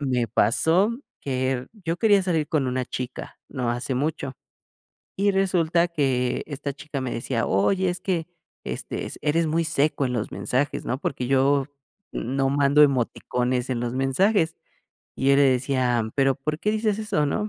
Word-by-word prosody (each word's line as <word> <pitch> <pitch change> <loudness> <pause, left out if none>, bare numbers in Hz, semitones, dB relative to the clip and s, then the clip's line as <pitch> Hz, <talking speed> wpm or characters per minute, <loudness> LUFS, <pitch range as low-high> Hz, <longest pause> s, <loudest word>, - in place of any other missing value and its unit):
Me 125 -4 0
pasó 170 - +2 0.2
que 130 -1 -2
yo 175 -6 -4
quería 205 -3 +4
salir 160 -5 0
con 145 -4 +1
una 125 0 -1
chica, 125 0 -6
no 125 -4 -2
hace 120 +2 -2
mucho, 140 0 -2 0.9
y 200 +1 +3
resulta 175 -3 +2
que 130 -6 0
esta 145 -1 -4
chica 145 0 -6
me 130 -1 -3
decía: 115 0 -2
"Oye, 185 - +2
es 180 - -4
que, 170 -4 -1 0.4
este, - - -4
es - - -7
eres 160 +2 +2
muy 165 +2 +1
seco 150 -3 +1
en 125 - -2
los 110 -3 -2
mensajes", 135 +3 -1
¿no?, 130 - -2
porque 125 -3 -3
yo 135 +1 +3 0.5
no 135 +2 -1
mando 140 +1 +4
emoticones 125 -2 +1
en 120 -2 -1
los 120 0 -2
mensajes. 160 +7 +2 0.6
Y 135 - +1
yo 140 - +6
le 140 - +5
decía: 125 -3 +2
"Pero, 135 -1 +3
¿por 150 +3 -3
qué 210 - +1
dices 215 -1 0
eso, 205 -9 0
no?". 210 +9 -1
140 Hz, 170 wpm, -24 LUFS, 130-165 Hz, 0.9 s, yo